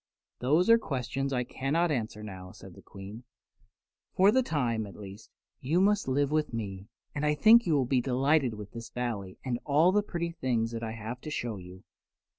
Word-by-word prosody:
"Those 150 +8 +2
are 230 0 +7
questions 135 - -3
I 125 -2 0
cannot 150 +7 0
answer 110 -5 -3
now," 95 -3 -8
said - - -13
the - - -14
Queen. 100 +4 -10 0.9
"For 195 +2 +6
the 260 - +4
time, 120 - -1
at 100 - -11
least, 100 +1 -11 0.3
you 155 +7 +1
must 205 -2 +2
live 140 +2 +1
with 155 -6 0
me, 100 -3 -5 0.3
and 145 - -3
I 150 0 +2
think 225 +7 +6
you 160 - +3
will 135 -3 +2
be 125 0 +2
delighted 135 0 +2
with 105 -1 -9
this 115 -1 -8
Valley 110 -7 -4
and 120 -2 -1
all 155 +5 +4
the 210 +2 +3
pretty 170 -4 -3
things 120 -8 -1
I 115 -1 -4
have 115 +3 -6
to - - -7
show 120 -7 -3
you. 90 0 -12
125 Hz, 195 wpm, -29 LUFS, 110-155 Hz, 0.9 s, are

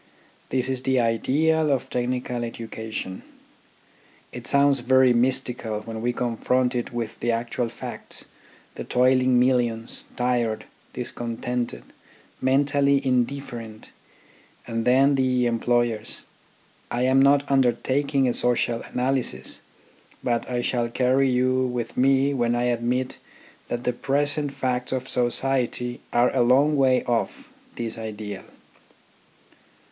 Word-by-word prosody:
This 130 -1 0
is 130 -1 -2
the 130 0 +1
ideal 150 +7 +2
of 135 -2 0
technical 125 0 -2
educa 115 -1 -6
tion. 95 -3 -5 1.1
It - - -4
sounds 140 -1 +4
very 130 +1 +4
mystical 120 -3 0
when 110 0 -7
we 120 +1 +1
confront 125 +1 0
it 120 -1 -3
with 115 -2 -5
the 120 - 0
actual 115 +1 -2
facts, 120 - -6 0.5
the - - -6
toiling 130 0 +3
millions, 120 -3 +1
tired, 120 -3 0 0.3
discontented, 120 - -4 0.6
mentally 140 +1 +2
indifferent, 120 -3 -2 0.7
and 115 -1 -3
then 135 +3 +5
the 130 -2 +2
employers 120 -1 0 0.7
I 120 +1 -1
am 130 +1 +4
not 140 +1 +4
undertaking 135 +1 +2
a 120 - +1
social 120 -1 +1
analysis, 130 0 -2 0.6
but 120 0 -1
I 120 -1 -1
shall 120 -2 0
carry 130 +2 +2
you 130 +1 +2
with 120 -2 -4
me 135 +2 +3
when 120 -2 +1
I 120 - 0
admit 125 +1 -1 0.5
that 120 0 -3
the 125 - 0
present 145 +3 0
facts 125 -2 -2
of 130 0 -2
society 125 -1 0
are 120 +2 +2
a 130 - +3
long 135 +5 +4
way 130 -2 +3
off 120 -2 -2 0.3
this 115 -1 -4
ideal. 105 -2 -6
125 Hz, 120 wpm, -24 LUFS, 120-130 Hz, 1.1 s, then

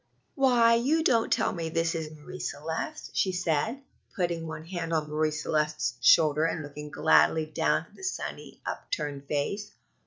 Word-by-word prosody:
"Why, 245 -5 +4
you 280 +8 +2
don't 230 -6 +2
tell - - +2
me 165 -2 -3
this 165 0 0
is 160 -2 -3
Marie 155 +4 -10
Celeste?" 160 - -4
she 190 - +1
said, 180 - -1 0.3
putting 170 -3 -1
one 160 0 -7
hand 165 -2 -4
on 155 -2 0
Marie 155 +1 +1
Celeste's 150 -5 -1
shoulder 155 +4 +5
and 160 -1 -1
looking 150 +1 -8
gladly 160 +1 +4
down 155 - +1
at - - -23
the - - -14
sunny, 380 - -5
upturned 145 - -4
face. 200 +9 -2
165 Hz, 160 wpm, -28 LUFS, 150-200 Hz, 0.3 s, shoulder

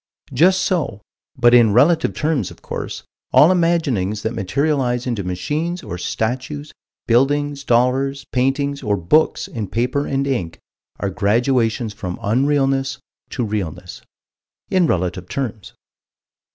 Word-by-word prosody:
Just 185 +8 +4
so, 160 - -1 0.4
but 120 -1 +5
in 115 -4 +6
relative 155 +8 +3
terms, 150 - 0
of - - -15
course, - - -5 0.3
all 160 - +7
imaginings 145 - +1
that 110 - -2
materialize 125 +3 0
into 120 -5 -2
machines 150 - -3
or 90 - -6
statues, 130 +9 -3 0.3
buildings, 140 +4 +1
dollars, 135 +3 +1
paintings 140 +2 0
or 105 -5 0
books 100 - +2
in 110 -4 -5
paper 125 +8 -1
and 135 0 0
ink 95 -12 -2 0.4
are 100 - -2
graduations 115 +2 +1
from 95 -4 -5
unrealness 135 +3 +1 0.3
to 125 - -2
realness 90 -4 -5 0.7
in 185 -3 +3
relative 90 - -2
terms. 115 -7 -4
125 Hz, 125 wpm, -20 LUFS, 105-145 Hz, 0.7 s, all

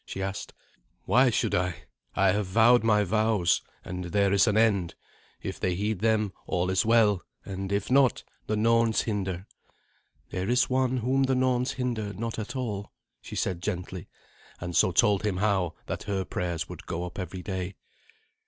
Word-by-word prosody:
she - - -7
asked. 95 +1 -4 0.5
"Why 125 +1 +5
should 115 - 0
I? 90 -1 -1 0.3
I - - +4
have 100 0 -1
vowed 115 +5 +5
my 105 -2 +4
vows, 105 -3 +2 0.2
and 90 0 -5
there 100 +2 +2
is 100 +3 +4
an 105 0 +2
end. 100 -7 +2 0.5
If - - -5
they 90 -1 0
heed 105 +1 -1
them, 110 -3 +1
all 90 +1 0
is 95 - +2
well; 110 -4 +4 0.2
and 95 0 -5
if 100 +3 -1
not, 135 -2 +4 0.2
the 110 - 0
Norns 115 0 +3
hinder." 95 -4 -3 0.9
"There 95 +3 -2
is 125 +2 +2
One 130 0 +2
whom 130 +3 +1
the 135 0 +2
Norns 125 0 +1
hinder 115 -5 -2
not 115 +3 -4
at 110 +5 -5
all," 105 -6 -4 0.3
she - - -9
said 90 -2 -1
gently, 90 -2 -4 0.5
and 85 0 -5
so 95 - +4
told 100 +3 +3
him 105 -4 0
how 95 -4 +1
that - - -4
her 95 -2 -1
prayers 85 -4 -3
would - - -10
go 85 +1 -3
up 90 +2 -8
every 90 0 -5
day. 95 -1 -4
100 Hz, 175 wpm, -27 LUFS, 95-115 Hz, 0.9 s, Why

